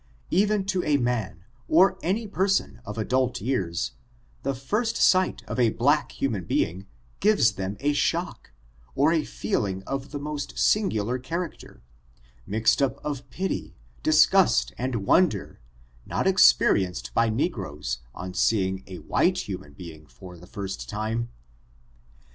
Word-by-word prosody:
Even 205 +2 +2
to 190 -2 0
a 145 -1 +2
man, 110 - -2 0.2
or 185 +3 +4
any 205 +6 -1
person 195 0 0
of 105 +2 -7
adult 125 +2 0
years, 95 -9 -1 0.5
the 135 0 -2
first 210 - -1
sight 185 0 +3
of - - -4
a 120 -2 +4
black 140 +8 +1
human 115 -9 -2
being, 95 +3 -1 0.3
gives 205 - +4
them 95 0 -5
a 145 +2 +1
shock, - - -1 0.4
or 145 +4 +3
a 160 -2 +2
feeling 100 - -2
of 135 0 -4
the 145 - -5
most 145 0 -5
singular 125 - +1
character, 165 +6 -6 0.6
mixed 110 +6 +2
up 135 - +1
of 145 -3 -4
pity, 190 +1 -4 0.3
disgust - - +4
and 120 -5 -3
wonder, 110 - +2 0.5
not - - -1
experienced - - +4
by 115 - +3
negroes, 95 - -2 0.2
on 90 +1 -6
seeing 95 -1 +1
a 95 -2 -8
wliite 180 0 +1
human 90 -7 -7
be 85 +1 -9
ing 75 -1 -17
for 90 +8 -12
the 90 +1 -14
first 95 -1 -6
time. 110 +3 -2
120 Hz, 140 wpm, -25 LUFS, 95-150 Hz, 0.6 s, or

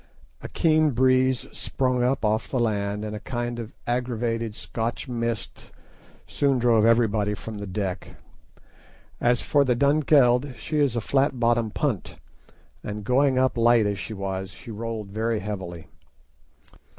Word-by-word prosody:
A - - -7
keen 155 -1 +3
breeze 130 0 +3
sprung 130 -2 -1
up 125 -1 +1
off 110 +1 0
land, 105 -3 -1
and 105 0 -5
a - - -5
kind 120 +1 -4
of 115 -1 -6
aggravated 115 -2 -2
Scotch 115 0 -4
mist 115 -2 -4 0.6
soon 140 -2 +1
drove 115 -2 +4
everybody 110 -3 +2
from 105 +1 -8
the 100 - -6
deck. 95 -1 -4 1.0
As 120 0 +2
for 145 -1 +3
the 125 -3 +1
Dunkeld, 140 -2 +3
she 155 - -2
is 140 -5 +2
a 115 - 0
flat 135 +1 +1
bottomed 115 -2 +1
punt, 130 -11 -2 0.7
and 105 0 -5
going 130 +4 +2
up 130 0 +2
light 115 -1 +4
as 100 -1 -1
she 110 - -5
was, 95 -1 -4
she 115 +5 -11
rolled 110 -2 -5
very 110 +1 -1
heavily. 90 -5 -6
115 Hz, 145 wpm, -25 LUFS, 105-130 Hz, 1.0 s, drove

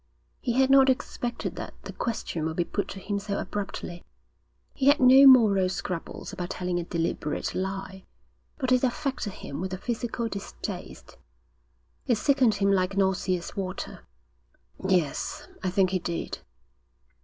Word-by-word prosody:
He 240 - -1
had 265 +2 +3
not 270 -1 +7
expected 250 -2 -2
that - - -6
the - - -7
question 220 -8 -3
would 160 - -4
be 175 - +1
put 200 - -2
to 195 - -7
him 200 +1 -2
so 200 0 -3
abruptly. 195 -3 -5 0.7
He 270 - 0
had 285 +1 +6
no 265 +2 +8
moral 210 -8 +7
scruples 185 +1 -5
about 180 -2 -4
telling 180 -1 -2
a - - -2
deliberate 165 -3 -2
lie, 190 0 -4 0.5
but 260 -3 -1
it 255 0 +4
affected 260 -5 -1
him 140 -3 -7
with 185 0 -3
a - - -7
physical 235 +2 -3
distaste. 200 -3 -7 0.9
It 240 - +4
sickened 255 -1 +3
him 200 0 +2
like 190 0 +1
nauseous 185 -2 0
water. 185 -2 -4 0.8
'Yes, 180 -6 0 0.2
I 185 - +1
think 185 0 +2
he 185 - +1
did.' 170 -1 -4
195 Hz, 150 wpm, -27 LUFS, 185-245 Hz, 0.9 s, no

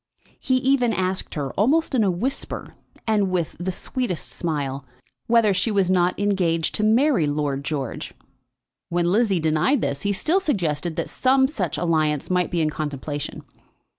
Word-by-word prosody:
He 260 - +1
even 255 -2 +2
asked 185 -1 -2
her, 140 -3 -2
almost 295 +10 +2
in 240 -4 +3
a 200 - +3
whisper, 215 +10 -3 0.3
and 210 -3 +2
with 175 -3 -1
the 185 +2 -2
sweetest 200 -1 -3
smile, 140 -5 -3 0.4
whether 230 -3 +4
she 190 +5 0
was 195 -3 +2
not 180 0 +2
engaged 180 -5 +1
to 215 - -1
marry 225 - +3
Lord 145 -2 -1
George. 140 -4 -4 0.7
When 175 0 +1
Lizzie 205 -3 +2
denied 160 - +2
this, 140 0 -2
he 205 - 0
still 315 - +2
suggested 175 - -1
that - - -3
some 265 +1 +3
such 190 - -3
alliance 155 -3 0
might 180 -1 +2
be 170 - 0
in 155 -1 +1
contemplation. 145 -1 -4
185 Hz, 160 wpm, -23 LUFS, 155-225 Hz, 0.7 s, whether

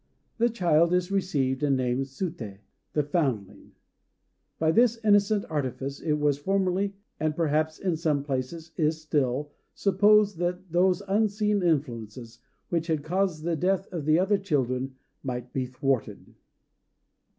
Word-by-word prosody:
The 235 +1 +4
child 170 -6 +3
is 180 +1 0
received, 140 -10 0
and 140 -2 +2
named 130 +1 0
"Suté," 135 - -5 0.4
the 150 - +2
foundling. 135 - -2 0.8
By 160 0 +2
this 235 +4 +3
innocent 205 0 +4
artifice, 140 -2 -3
it 155 - 0
was 150 -2 +1
formerly 195 +3 0 0.2
(and 155 -1 0
perhaps 155 -1 0
in 185 -4 -1
some 155 -4 0
places 145 +4 -4
is 155 0 +1
still) 145 -2 -1 0.2
supposed 205 -1 +4
that 180 0 -2
those 185 +3 +2
unseen 210 0 +1
influences, 120 - -2 0.3
which 170 -1 -1
had 155 -3 0
caused 175 -1 -1
the 170 0 0
death 190 +4 +1
of 165 -5 -3
the 155 +1 +4
other 195 +3 +2
children, 130 -7 -1 0.3
might 125 -2 -5
be 130 -1 -1
thwarted. 130 -5 -2
160 Hz, 140 wpm, -27 LUFS, 135-190 Hz, 0.8 s, The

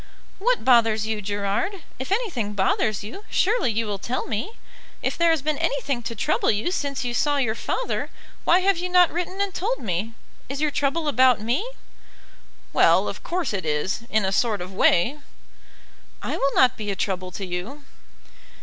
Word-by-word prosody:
"What - - +1
bothers 225 -4 +4
you, 220 -1 -2
Gerard? 205 - -2 0.2
If 260 +7 -5
anything 345 - -1
bothers 205 +1 +1
you, 245 - -8
surely 415 - +2
you 225 +1 -1
will 205 -2 -3
tell 245 +6 -3
me. 235 - -3 0.5
If - - 0
there 340 0 +3
has 320 -4 +2
been 305 -1 -1
anything 295 - -1
to 230 0 -5
trouble - - +1
you 215 +11 +1
since 280 -7 -2
you 240 - -2
saw 290 +3 +2
your 245 -6 +1
father - - -2 0.3
why 360 +2 +4
have 385 -2 +2
you 360 +1 -2
not 360 -1 +5
written 360 +3 -3
and 400 -1 0
told 445 +9 -1
me? 215 +2 -3 0.3
Is 275 +1 -4
your 300 -1 +1
trouble 290 +3 0
about 255 -4 +4
me?" 245 - -1 1.0
"Well, - - +5
of - - -5
course 345 -9 -2
it 195 - -2
is, 150 +7 -1
in 215 -2 +2
a 190 - 0
sort 215 0 +1
of 180 +2 -7
way." 215 +9 +3 1.0
"I - - -2
will 275 0 0
not 255 -2 +4
be 210 -1 -4
a 200 - -1
trouble 185 -1 -2
to 195 - -4
you." 185 +12 -5
250 Hz, 185 wpm, -24 LUFS, 210-340 Hz, 1.0 s, not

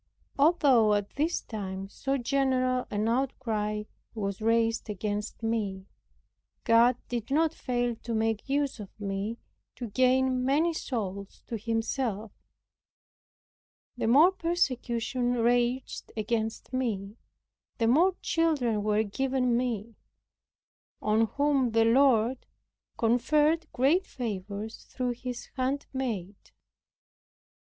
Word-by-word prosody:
Although 275 -9 +5
at 205 -1 -2
this 315 +5 0
time 195 -3 -5
so 270 +7 -2
general 255 -1 +1
an 210 +1 -1
outcry 225 -4 -1 0.3
was 200 -2 -3
raised 225 0 +1
against 210 +2 -4
me, 205 -4 -2 0.8
God 235 +1 +5
did 235 -1 -4
not 315 +3 +2
fail 245 -5 -1
to 235 0 -4
make 225 +2 -1
use 280 -2 0
of 205 -2 -7
me 200 +2 -3 0.4
to 240 -3 -6
gain 255 +1 +3
many 300 +6 +2
souls 200 -9 -5
to 235 - -5
Himself. 225 -1 -2 1.6
The 240 - -2
more 295 +10 +7
persecution 255 -8 -1
raged 245 +2 0
against 220 +2 -2
me 215 -5 -2 0.6
the 230 - +1
more 335 +11 +4
children 280 -10 +1
were 210 +1 +2
given 250 +3 0
me, 235 -3 -2 1.1
on 220 +1 +2
whom 275 -3 +1
the 225 0 +4
Lord 245 0 +3 0.5
conferred 300 +8 +2
great 305 +9 +2
favors 210 -1 -5
through 250 -1 -2
His 245 0 -6
handmaid. 255 -7 -2
240 Hz, 105 wpm, -28 LUFS, 215-265 Hz, 1.6 s, more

